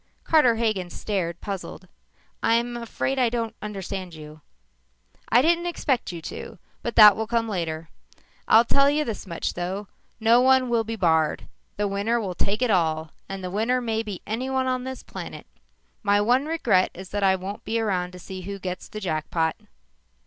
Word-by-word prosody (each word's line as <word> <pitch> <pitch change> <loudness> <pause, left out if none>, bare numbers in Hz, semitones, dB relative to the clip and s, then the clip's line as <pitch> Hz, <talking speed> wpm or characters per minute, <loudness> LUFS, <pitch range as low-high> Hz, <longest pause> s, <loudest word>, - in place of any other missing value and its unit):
Carter 295 -8 +4
Hagen 215 -6 0
stared, 175 -4 -3
puzzled. 195 -2 -6 0.5
"I'm 235 +1 +2
afraid 240 +3 -2
I 245 -2 +4
don't 230 -1 -2
understand 190 -4 -5
you." 155 0 -11 0.9
"I 240 +3 +5
didn't 340 +2 +2
expect 275 - -1
you 170 -2 -8
to, - - -7 0.2
but 235 - -4
that 210 -3 +10
will 220 0 -3
come 230 0 0
later. 165 -5 -3 0.6
I'll 225 +2 +7
tell 275 +4 +4
you 300 +1 +1
this 220 -4 -5
much, 170 -2 -3
though. 190 +3 -4 0.3
No 230 +2 +5
one 260 -1 +4
will 230 -1 +2
be 225 +1 -4
barred. 160 -6 +2 0.3
The 205 0 +1
winner 200 +4 0
will 195 -5 -3
take 205 +6 0
all, 160 -6 +1 0.2
and 195 -1 -5
the 180 - -4
winner 225 +6 +1
may 225 -2 -1
be 210 -5 -7
anyone 260 +4 -1
on 255 -1 -1
this 260 0 -6
planet. - - -8 0.6
My 205 -1 +3
one 250 +7 +2
regret 240 - +2
is 185 +1 -9
that 205 - -2
I 190 -1 +4
won't 190 +2 -6
be 230 +1 -1
around 185 -5 -1
to - - -9
see 185 +1 -8
who 200 +2 -5
gets 185 -1 -5
the 215 - -6
jackpot." 160 -2 -1
210 Hz, 180 wpm, -25 LUFS, 185-235 Hz, 0.9 s, that